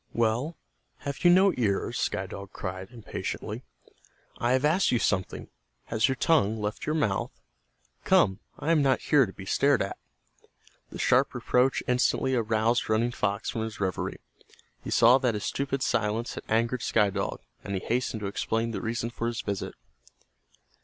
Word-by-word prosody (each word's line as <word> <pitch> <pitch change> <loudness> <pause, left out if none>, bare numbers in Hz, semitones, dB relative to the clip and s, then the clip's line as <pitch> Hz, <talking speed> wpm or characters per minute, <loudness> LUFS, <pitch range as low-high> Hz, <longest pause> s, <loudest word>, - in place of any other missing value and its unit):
"Well, 120 +8 0 0.4
have 140 -1 -5
you 175 - +7
no 190 +2 +6
ears?" 100 -5 0
Sky - - -1
Dog 100 0 -9
cried, 95 -1 -6
impatiently. 115 -3 -5 0.8
"I 120 +1 +2
have 130 +2 +2
asked 170 +6 +3
you 120 - +3
something. 95 -4 -1 0.4
Has 115 +1 +1
your 130 - +1
tongue 120 -8 +2
left 105 +1 -4
your 155 - +1
mouth? 105 -11 0 0.7
Come, 95 +1 +3 0.2
I 160 - -1
am 160 -3 +4
not 135 -2 +3
here 140 -6 +3
to - - -8
be 95 +1 -10
stared 140 +5 +3
at." 100 - -6 0.9
The - - -8
sharp - - +2
reproach 125 +2 +2
instantly 125 +1 +2
aroused 115 0 +1
Running 115 +2 +2
Fox 100 -4 -1
from 115 - -3
his 110 -1 -5
reverie. 95 -3 -2 0.7
He - - -6
saw 120 +3 +6
that 125 -4 +1
his 105 - -4
stupid 135 -1 -2
silence 110 -1 0
had - - -8
angered 115 +2 +1
Sky 105 -1 +2
Dog, 100 0 -3 0.2
and 100 - -4
he - - -1
hastened 115 +1 -2
to - - -3
explain 115 +3 -1
the - - -4
reason 115 +1 -2
for 115 0 -3
his 120 -1 -2
visit. 100 -2 -4
115 Hz, 170 wpm, -27 LUFS, 105-130 Hz, 0.9 s, you